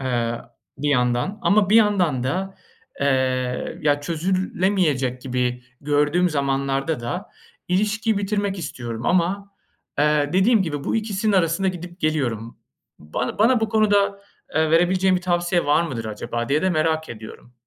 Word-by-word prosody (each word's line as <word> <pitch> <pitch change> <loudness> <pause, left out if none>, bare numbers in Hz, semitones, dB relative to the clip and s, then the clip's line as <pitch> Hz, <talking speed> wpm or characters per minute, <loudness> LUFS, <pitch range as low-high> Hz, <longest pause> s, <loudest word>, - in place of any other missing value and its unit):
eee, 120 -3 -1 0.4
bir 145 +1 -1
yandan. 125 - +1
Ama 205 -1 +3
bir 220 - +6
yandan 185 - +3
da, 190 +7 -2 0.5
ııı, 130 -2 0
ya 145 -1 +2
çözülemeyecek 170 -5 0
gibi 125 -1 -2 0.2
gördüğüm 150 +5 +2
zamanlarda 140 0 -1
da 150 - -5 0.4
ilişkiyi 210 +3 +1
bitirmek 200 -1 -1
istiyorum. 120 -7 -5
Ama, 190 +3 0 0.5
eee, 150 -1 +2
dediğim 195 +3 +4
gibi 145 -5 -4
bu - - 0
ikisinin 215 -1 -1
arasında 185 0 +2
gidip 180 0 -7
geliyorum. 120 -8 -1 0.4
Bana 80 - -4
bana 235 +2 +4
bu 220 - 0
konuda, 200 -2 +2 0.3
eee, 155 +1 +2
verebileceğin 185 +3 +3
bir - - -3
tavsiye 175 -2 0
var 145 +3 +4
mıdır 130 -9 -4
acaba 115 +3 -4
diye 150 +4 +1
de 185 - +2
merak 160 -1 0
ediyorum. 115 +2 -10
160 Hz, 140 wpm, -22 LUFS, 130-190 Hz, 0.5 s, bir